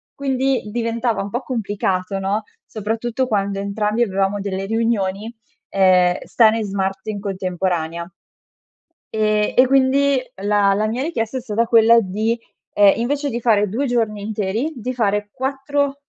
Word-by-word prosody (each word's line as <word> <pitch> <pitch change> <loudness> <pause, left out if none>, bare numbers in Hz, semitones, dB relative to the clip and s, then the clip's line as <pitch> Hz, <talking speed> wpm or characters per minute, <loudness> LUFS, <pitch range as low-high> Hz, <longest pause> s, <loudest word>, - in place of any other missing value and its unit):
quindi 265 -4 -1
diventava 230 -1 -1
un 200 - -6
po' 240 - -2
complicato 195 -6 -2
no, 200 +3 -1 0.2
soprattutto 225 +4 -2
quando 200 -2 -1
entrambi 210 +3 0
avevamo 195 -1 0
delle 195 -1 -3
riunioni, 225 -1 -1 0.4
ehm, 185 -2 +4
stare 225 -1 +3
smart 195 0 -3
in 210 -2 -3
contemporanea. 180 -4 -2 1.0
E 215 -1 +1
e 255 - +7
quindi 275 0 +3 0.2
la 205 -1 +3
la 215 +2 0
mia 240 +4 -2
richiesta 260 -6 -2
è - - -5
stata 230 -1 -1
quella 230 0 +6
di 220 +3 -1 0.4
ehm, 205 -1 +6
invece 280 +4 -1
di 235 +1 -3
fare 210 -3 +3
2 260 +8 -1
giorni 225 -4 -1
interi 215 +7 -2
di 250 +1 -4
fare 210 -3 0
4- 275 +1 -2
215 Hz, 140 wpm, -20 LUFS, 200-240 Hz, 1.0 s, e